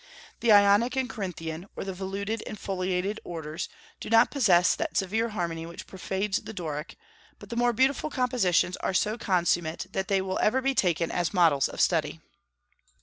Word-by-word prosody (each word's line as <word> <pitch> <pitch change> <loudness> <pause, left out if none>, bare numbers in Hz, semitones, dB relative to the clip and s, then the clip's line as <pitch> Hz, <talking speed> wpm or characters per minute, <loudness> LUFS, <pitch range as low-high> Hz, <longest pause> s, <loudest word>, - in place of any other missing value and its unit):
The 235 - +3
Ionic 205 +4 +5
and 265 -1 0
Corinthian, 180 -6 -5
or - - -4
the 190 0 -4
voluted 200 +4 -4
and 215 - -6
foliated 190 +1 -2
orders, 160 0 -5 0.3
do - - -7
not 225 0 +5
possess 185 -11 +4
that - - -3
severe 220 +4 0
harmony 170 -5 -3
which 170 - -9
pervades 190 +1 -2
the 220 +1 -9
Doric; 155 -3 -5 0.4
but - - -13
the - - -3
more 240 0 +3
beautiful 265 +6 +1
compositions 240 - +1
are 190 - -2
so 215 +3 +1
consummate 175 -6 0
that 190 -1 -2
they 195 -1 +2
will 190 0 -2
ever 250 +5 +3
be 270 +1 0
taken 170 - +1
as 175 +2 -1
models 160 -6 +4
of - - -8
study. - - +1
190 Hz, 175 wpm, -27 LUFS, 175-220 Hz, 0.4 s, Ionic